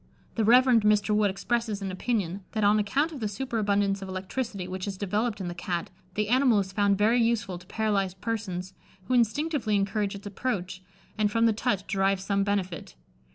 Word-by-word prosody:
The 225 Hz, -, 0 dB
Reverend 245 Hz, +1 st, +6 dB
Mr. 210 Hz, 0 st, +3 dB
Wood 210 Hz, -1 st, +3 dB
expresses 220 Hz, +2 st, -1 dB
an 195 Hz, -1 st, -4 dB
opinion, 195 Hz, -2 st, -2 dB
that 215 Hz, -2 st, 0 dB
on 205 Hz, +1 st, +5 dB
account 275 Hz, +10 st, +1 dB
of 295 Hz, -, -7 dB
the 215 Hz, -, -1 dB
superabundance 205 Hz, -3 st, 0 dB
of 195 Hz, -, -6 dB
electricity 190 Hz, +1 st, -4 dB
which 185 Hz, +1 st, -5 dB
is 195 Hz, -2 st, -4 dB
developed 210 Hz, +3 st, -1 dB
in 185 Hz, -, -4 dB
the 175 Hz, -, -4 dB
Cat, 175 Hz, 0 st, -4 dB, 0.2 s
the 210 Hz, 0 st, 0 dB
animal 255 Hz, -2 st, +4 dB
is 190 Hz, -1 st, -1 dB
found 200 Hz, -1 st, +2 dB
very 225 Hz, +4 st, +3 dB
useful 215 Hz, -6 st, 0 dB
to 180 Hz, -, -17 dB
paralysed 195 Hz, -4 st, -1 dB
persons, 190 Hz, -4 st, -4 dB, 0.3 s
who 220 Hz, -, -2 dB
instinctively 245 Hz, -1 st, +1 dB
encourage 200 Hz, 0 st, 0 dB
its 200 Hz, -, -10 dB
approach, 195 Hz, -4 st, -3 dB, 0.4 s
and 210 Hz, -1 st, +2 dB
from 230 Hz, +2 st, +3 dB
the 225 Hz, -, +4 dB
touch 200 Hz, -2 st, -1 dB
derive 195 Hz, -1 st, +1 dB
some 200 Hz, +1 st, 0 dB
benefit. 190 Hz, -, -2 dB
205 Hz, 190 wpm, -27 LUFS, 195-225 Hz, 0.4 s, Reverend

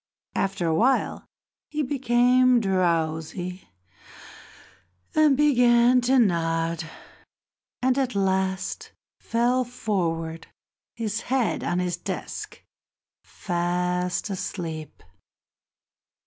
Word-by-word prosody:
After 195 Hz, -2 st, -1 dB
a 165 Hz, -, +1 dB
while 250 Hz, +10 st, +1 dB, 0.4 s
he 300 Hz, 0 st, -2 dB
became 250 Hz, -1 st, +3 dB
drowsy 175 Hz, -2 st, -1 dB, 1.4 s
and 305 Hz, -3 st, +4 dB
began 245 Hz, -3 st, +4 dB
to 260 Hz, +2 st, +3 dB
nod, 165 Hz, -5 st, +1 dB, 0.9 s
and 260 Hz, +1 st, +2 dB
at 255 Hz, -4 st, -1 dB
last 190 Hz, -1 st, -1 dB, 0.3 s
fell 245 Hz, +2 st, +1 dB
forward, 170 Hz, -9 st, -3 dB, 0.5 s
his 225 Hz, -1 st, -3 dB
head 255 Hz, -3 st, 0 dB
on 175 Hz, -, -1 dB
his 180 Hz, -1 st, -1 dB
desk, -, -, -6 dB, 0.6 s
fast 180 Hz, +1 st, -2 dB
asleep. 165 Hz, -5 st, -5 dB
195 Hz, 80 wpm, -25 LUFS, 175-245 Hz, 1.4 s, and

